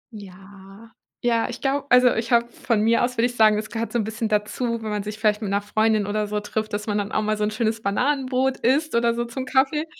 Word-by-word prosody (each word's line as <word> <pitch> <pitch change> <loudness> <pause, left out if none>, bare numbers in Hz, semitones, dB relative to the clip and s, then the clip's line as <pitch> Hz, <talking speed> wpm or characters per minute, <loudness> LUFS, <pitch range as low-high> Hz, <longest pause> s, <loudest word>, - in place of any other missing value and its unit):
Ja, 195 +2 -13 0.3
ja, 235 -1 +1
ich 245 - -7
glaube 275 +1 -1
also 250 0 +6
ich 230 +2 -3
habe, 235 0 +4
von 230 -3 -1
mir 230 +2 +3
aus, 250 0 -2
würde 230 - +3
ich 245 0 -2
sagen, 215 -2 +5
es 215 0 -4
gehört 230 0 -3
so 240 - 0
'n 220 - 0
bisschen 220 +1 -3
dazu, 225 +2 -1
wenn 215 - -4
man 210 - -2
sich 210 +1 -6
vielleicht 215 0 +1
mit 205 - -3
'ner 200 +1 0
Freundin 215 0 +1
oder 210 +1 -2
so 210 0 -2
trifft, 215 +1 -4
dass 210 0 -3
man 210 -1 -1
dann 205 +1 -4
auch 215 - 0
mal 215 0 0
so 210 - -1
'n 210 - +1
schönes 220 0 -1
Bananenbrot 260 +4 0
isst 285 +5 +1
oder 235 0 +2
so 240 0 -2
zum 255 +2 -6
Kaffee. 270 +4 +1
225 Hz, 260 wpm, -23 LUFS, 210-245 Hz, 0.3 s, also